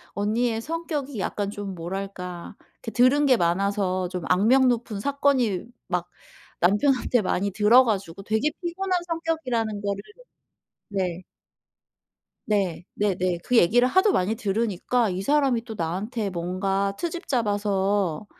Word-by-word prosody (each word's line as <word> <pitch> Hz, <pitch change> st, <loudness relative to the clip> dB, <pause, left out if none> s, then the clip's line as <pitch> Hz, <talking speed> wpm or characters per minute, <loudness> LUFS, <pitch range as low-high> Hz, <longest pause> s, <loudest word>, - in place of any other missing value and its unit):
언니의 225 Hz, +3 st, 0 dB
성격이 300 Hz, -4 st, -4 dB
약간 200 Hz, +1 st, -2 dB
좀 205 Hz, -2 st, -6 dB
뭐랄까 180 Hz, 0 st, -6 dB, 0.3 s
이렇게 -, -, -4 dB
들은 255 Hz, +5 st, +4 dB
게 255 Hz, -3 st, +5 dB
많아서 185 Hz, +1 st, 0 dB
좀 180 Hz, -1 st, -5 dB
악명 230 Hz, +9 st, +4 dB
높은 230 Hz, -3 st, -2 dB
사건이 265 Hz, -6 st, +1 dB, 0.2 s
막 180 Hz, -1 st, -2 dB, 0.5 s
남편한테 245 Hz, +6 st, +3 dB
많이 200 Hz, +1 st, -1 dB
들어가지고 210 Hz, -4 st, +3 dB
되게 220 Hz, +8 st, +1 dB
피곤한 365 Hz, +1 st, -1 dB
성격이라는 265 Hz, -11 st, -2 dB
거를 200 Hz, 0 st, -2 dB, 0.9 s
네. 185 Hz, -3 st, -2 dB, 1.2 s
네. 195 Hz, -6 st, 0 dB
네네. 185 Hz, -3 st, 0 dB
그 250 Hz, -, +2 dB
얘기를 240 Hz, +7 st, +5 dB
하도 375 Hz, +9 st, +4 dB
많이 200 Hz, -, +1 dB
들으니까 220 Hz, +2 st, 0 dB
이 185 Hz, 0 st, -3 dB
사람이 265 Hz, -1 st, +2 dB
또 225 Hz, -2 st, -7 dB
나한테 200 Hz, +6 st, -2 dB
뭔가 195 Hz, +3 st, -1 dB
트집 345 Hz, 0 st, -4 dB
잡아서 205 Hz, -, 0 dB
205 Hz, 275 characters per minute, -25 LUFS, 190-250 Hz, 1.2 s, 게